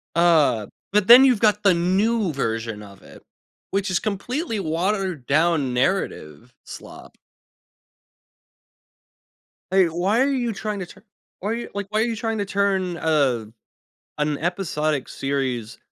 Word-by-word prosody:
Uh, 155 -11 +3 0.3
but 210 -1 +2
then 250 +3 +10
you've 250 -6 +3
got 210 -1 +3
the 195 -3 +5
new 190 +3 +1
version 115 -5 -3
of 100 -1 -14
it, - - -15 0.5
which 195 0 -1
is 175 - +1
completely 225 - -3
watered 180 - -2
down 150 -3 +2
narrative 125 - -2
slop. - - -12 2.5
Like, 190 -2 +4
why 185 +9 0
are 275 - +3
you 240 -4 -1
trying 210 0 -4
to 180 - -4
tu - - -16 0.4
why 205 - -4
are - - 0
y 235 - -5
like, 200 -1 -4
why 215 +1 0
are - - +3
you 230 -1 -2
trying 225 0 -3
to 200 - -2
turn 195 -3 0
a 140 -9 +1 0.7
an 150 -1 -1
episodic 155 -5 -2
series 130 -4 -3
180 Hz, 145 wpm, -22 LUFS, 140-210 Hz, 2.5 s, then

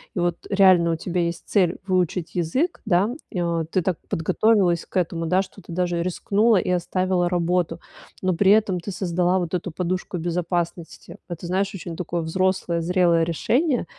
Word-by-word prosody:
И - - -1
вот 175 -1 0
реально 185 -4 +5
у - - 0
тебя 180 +2 -3
есть 170 0 -2
цель 185 -4 +2
выучить 180 -2 -1
язык, 255 - 0
да, 185 +4 +2 0.2
и, 180 - -3
о, 170 -1 -1
ты 180 +3 -1
так 175 0 -1
подготовилась 180 +1 +2
к - - -23
этому, 170 -2 0
да, 180 +3 +2
что 195 +1 -10
ты 170 - -10
даже 175 -1 0
рискнула 205 +5 +2
и 180 - -1
оставила 180 0 0
работу. 175 -1 0 0.4
Но 185 -1 +1
при 190 +3 +4
этом 205 -4 +3
ты 200 - -6
создала 180 0 0
вот 175 -2 -4
эту 180 0 -2
подушку 180 +2 -3
безопасности. 170 0 -3
Это, 175 0 -6
знаешь, 195 +3 0
очень 170 -3 -7
такое 175 -1 -3
взрослое, 180 0 0
зрелое 170 -1 +3
решение. 245 - 0
180 Hz, 175 wpm, -23 LUFS, 170-190 Hz, 0.4 s, реально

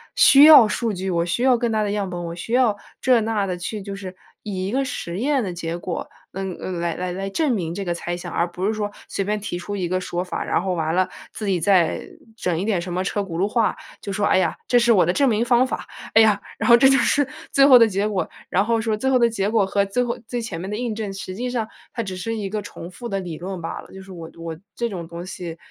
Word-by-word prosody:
需 280 +1 +8
要 300 -8 +10
数 220 +2 -1
据， 190 +1 -3
我 170 -2 +1
需 175 +7 -2
要 255 -2 +5
更 235 -1 -1
大 215 -1 +1
的 205 - -1
样 205 -2 -2
本， 175 -1 -5
我 170 0 -5
需 225 +6 -6
要 245 -5 +3 0.2
这、 250 -3 +4
那 215 -2 0
的 180 -1 -3
去 200 +4 -5
就 195 0 -6
是 190 -2 -8 0.3
以 190 -3 -3
一 - - -3
个 270 +3 0
实 185 -8 -5
验 270 0 +1
的 185 - -3
结 170 -1 -4
果， 175 0 -5 0.2
嗯， 190 -1 -4
嗯， 180 -2 -4
来 170 -1 -1
来 185 +2 -3
证 295 +8 0
明 170 -6 -2
这 195 - -4
个 175 - 0
猜 175 0 -4
想， - - -7
而 170 - +1
不 180 +2 -3
是 220 - +1
说 210 -1 -3 0.2
随 195 - -2
便 210 +2 -1
提 195 -3 -4
出 205 +3 -5
一 180 -3 -1
个 185 +1 -1
说 175 0 -3
法， 180 - -4
然 - - 0
后 190 -1 -1
完 160 -1 -1
了 185 0 +2 0.2
自 215 - -5
己 190 -3 +1
再 180 -2 +3 0.3
整 180 -7 -1
一 190 - -2
点 200 -6 +1
什 180 - -6
么 180 +1 -1
车 205 +2 -1
轱 175 -4 -5
辘 195 - +2
话， 225 +1 +1 0.3
就 200 - -5
说： 205 +1 0
“哎 - - +4
呀， 185 - +1
这 245 - +4
是 235 0 +4
我 190 -7 +5
的 175 - +1
证 280 +3 +3
明 225 +1 +1
方 245 +1 +4
法。 - - -5 0.3
哎 225 - +9
呀， 210 -2 +3 0.2
然 - - -1
后 235 - +10
这 265 +3 +6
就 270 - +5
是 285 0 +2 0.2
最 275 - +5
后 260 - +9
的 230 - +7
结 200 +1 0
果。” 200 -3 -1 0.2
然 195 +3 +2
后 230 0 +1
说， 220 -1 -1
最 265 +5 0
后 255 - +4
的 235 -1 +4
结 200 -3 -1
果 220 -2 +3
和 200 +1 +1
最 225 +6 0
后 240 -1 -2
最 245 +1 -3
前 225 -8 -5
面 190 - -5
的 - - -2
印 235 -2 -2
证， 210 -3 -4
实 190 -1 -6
际 245 +4 -3
上 230 -3 -1 0.3
它 230 - -2
只 190 -3 -6
是 225 +4 -3
一 200 -2 -3
个 210 0 -3
重 170 -3 -9
复 240 +6 -7
的 195 - -1
理 175 -4 -6
论 185 0 -6
吧。 165 - -5
就 190 - -9
是 190 0 -12
我 165 -2 -8
我 165 -1 -6 0.2
这 235 0 -1
种 175 -5 -6
东 170 +1 -7
西 175 -3 -7
195 Hz, 305 characters per minute, -22 LUFS, 180-225 Hz, 0.3 s, 要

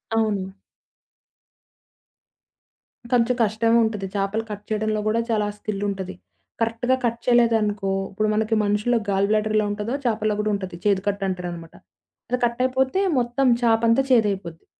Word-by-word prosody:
అవును. 205 -4 0 2.6
కొంచెం 245 0 +3
కష్టమే 225 +2 +2
ఉంటది. 215 -3 -2
చేపలు 200 +3 -1
కట్ 205 0 -6
చేయడంలో 215 0 -1
కూడా, 220 +2 +2
చాలా 210 -2 +1
స్కిలుంటది. 195 -3 -4 0.5
కరెక్ట్‌గా 230 +3 +1
కట్ 235 0 -1
చేయలేదనుకో, 220 -5 +2 0.2
ఇప్పుడు 215 +2 0
మనకి 220 +1 +1
మనుషుల్లో 210 +4 +1
గాల్ 195 0 +2
బ్లాడర్ 215 0 +1
ఎలా 215 -1 +2
ఉంటదో, 210 +3 -3
చేపలో 215 -2 +1
కూడా 210 0 0
ఉంటది. 190 -3 -6
చేదు 195 -2 +2
కట్ 200 0 -1
అంటారనమాట. 175 -3 -6 0.5
అది 250 +1 0
కట్ 235 0 -2
అయిపోతే 260 +6 +1 0.2
మొత్తం 245 +2 0
చేప 225 -2 +3
అంతా 230 +4 +4
చేదైపోద్ది. 195 -8 +1
215 Hz, 135 wpm, -23 LUFS, 200-230 Hz, 2.6 s, అంతా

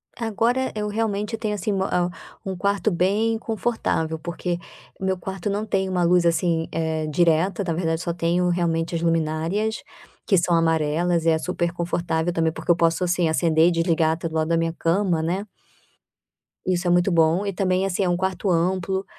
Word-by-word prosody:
Agora 235 +3 0
eu 210 -1 -2
realmente 210 0 -2
tenho, 215 -2 -2
assim, 210 +1 -2
uma 190 -1 0
ao 175 0 +1 0.4
um 190 -1 -3
quarto 200 +3 0
bem 205 +6 +1
confortável, 220 -8 -2
porque 170 +2 -3 0.4
meu 190 -1 -1
quarto 190 +2 -5
não 205 +2 -2
tem 195 -2 0
uma 180 -1 0
luz, 175 0 +3
assim, 165 -1 +1
eh, 160 -1 -1
direta, 170 +5 +2
na 170 -3 -1
verdade 165 -1 -1
só 170 -1 -2
tenho 175 +1 +1
realmente 170 -1 0
as 165 - -1
luminárias, 165 +6 0 0.4
que 195 - +3
são 175 0 +2
amarelas 165 +1 +1
e - - +5
é 160 - +3
super 170 +1 -2
confortável 170 -1 -1
também, 165 -1 +1
porque 170 - -1
eu - - +5
posso, 165 +1 +1
assim, 175 -2 +1
acender 160 0 +3
e - - +3
desligar, 165 -2 +2
até, 165 +1 -4
do 160 - -7
lado 155 0 +1
da 165 0 +2
minha 165 0 0
cama, 170 0 +1
né. 185 +6 -2 1.2
Isso 180 -1 0
é - - +3
muito 175 +2 +3
bom, 165 +3 +3
e 200 - -2
também 185 0 +1
assim, 195 0 0
é 180 - +1
um 175 - +1
quarto 190 +2 -1
amplo, 185 +2 0
175 Hz, 190 wpm, -23 LUFS, 165-195 Hz, 1.2 s, e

